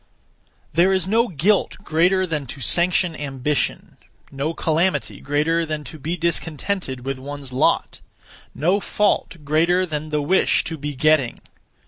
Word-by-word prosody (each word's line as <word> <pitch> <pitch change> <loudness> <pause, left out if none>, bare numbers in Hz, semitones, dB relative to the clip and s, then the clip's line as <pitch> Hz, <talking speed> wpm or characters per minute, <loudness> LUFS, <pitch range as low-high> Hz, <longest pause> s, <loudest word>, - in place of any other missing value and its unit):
There 175 +3 +4
is 190 -1 +1
no 230 +4 +3
guilt 190 +4 +1
greater 180 +3 +2
than 150 -6 -3
to 135 - -8
sanction 175 +3 +3
ambition; 140 0 -2 0.3
no 140 +3 -2
calamity 165 +4 0
greater 150 +4 +1
than 155 -2 -4
to 155 - -10
be 165 +5 -3
discontented 165 -4 -2
with 135 -1 -3
one's 140 -1 -7
lot; 130 - +1 0.6
no 175 +8 +2
fault 205 -3 0
greater 170 +5 +2
than 155 -2 -4
the 150 -1 -1
wish 185 +6 +3
to 165 - -4
be 145 -1 -5
getting. 150 -3 +2
155 Hz, 140 wpm, -22 LUFS, 145-180 Hz, 0.6 s, There